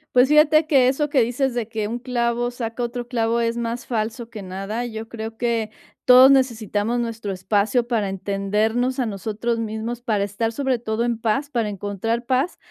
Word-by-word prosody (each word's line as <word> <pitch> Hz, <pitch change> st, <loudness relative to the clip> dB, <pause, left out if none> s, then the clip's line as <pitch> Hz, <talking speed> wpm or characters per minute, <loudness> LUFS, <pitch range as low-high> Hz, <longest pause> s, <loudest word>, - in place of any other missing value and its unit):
Pues 250 Hz, +1 st, +6 dB
fíjate 305 Hz, +1 st, +5 dB
que 270 Hz, -5 st, +4 dB
eso 285 Hz, +3 st, +1 dB
que 285 Hz, -3 st, +3 dB
dices 245 Hz, +3 st, 0 dB
de 240 Hz, -3 st, -2 dB
que 220 Hz, -2 st, -3 dB
un 235 Hz, +2 st, -4 dB
clavo 240 Hz, -1 st, -1 dB
saca 240 Hz, -1 st, -5 dB
otro 240 Hz, 0 st, -3 dB
clavo, 230 Hz, -1 st, 0 dB
es 230 Hz, 0 st, 0 dB
más 235 Hz, +1 st, -3 dB
falso 230 Hz, 0 st, -3 dB
que 215 Hz, -2 st, -7 dB
nada, 195 Hz, +5 st, -4 dB
yo 225 Hz, -1 st, -6 dB
creo 225 Hz, 0 st, -7 dB
que, 230 Hz, -2 st, 0 dB, 0.4 s
todos 255 Hz, +2 st, +8 dB
necesitamos 235 Hz, -3 st, +1 dB
nuestro 230 Hz, -3 st, -3 dB
espacio 205 Hz, +6 st, +1 dB
para 220 Hz, -5 st, 0 dB
entendernos 210 Hz, +6 st, -1 dB
a 255 Hz, -, 0 dB
nosotros 220 Hz, +2 st, -2 dB
mismos, 225 Hz, +2 st, -4 dB
para 215 Hz, -4 st, 0 dB
estar 205 Hz, +3 st, -2 dB
sobre 265 Hz, 0 st, -1 dB
todo 225 Hz, 0 st, -2 dB
en 235 Hz, -2 st, -1 dB
paz, 270 Hz, +6 st, 0 dB
para 230 Hz, -5 st, 0 dB
encontrar 205 Hz, +4 st, -3 dB
paz. 265 Hz, +7 st, 0 dB
230 Hz, 185 wpm, -22 LUFS, 220-245 Hz, 0.4 s, todos